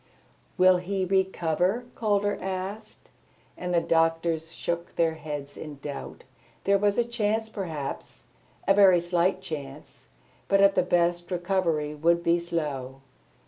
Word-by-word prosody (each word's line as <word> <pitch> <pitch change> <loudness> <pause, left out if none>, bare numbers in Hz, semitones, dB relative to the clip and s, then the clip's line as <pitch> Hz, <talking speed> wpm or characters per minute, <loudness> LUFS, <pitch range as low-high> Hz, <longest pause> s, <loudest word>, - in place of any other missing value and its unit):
"Will 185 0 +6
he 190 +1 -2
recover?" 190 +3 +1
Calder 205 -2 +1
asked, 195 +3 -6 0.4
and 180 0 -4
the 175 - +4
doctors 165 0 +1
shook 170 0 -4
their 165 -1 +2
heads 145 -2 -7
in 150 -2 -8
doubt. 140 -1 -7 0.4
There 200 0 +3
was 205 0 +2
a 240 - +4
chance 220 -2 -1
perhaps, 160 -10 -6 0.4
a 195 - +6
very 195 -3 +6
slight 175 +2 +1
chance; 145 -4 -8 0.4
but 195 - +3
at 200 0 +6
the 185 - +3
best, 175 -1 +1
recovery 175 -5 0
would 170 +3 +2
be 170 +1 +3
slow. 145 -6 -4
175 Hz, 135 wpm, -27 LUFS, 160-195 Hz, 0.4 s, Will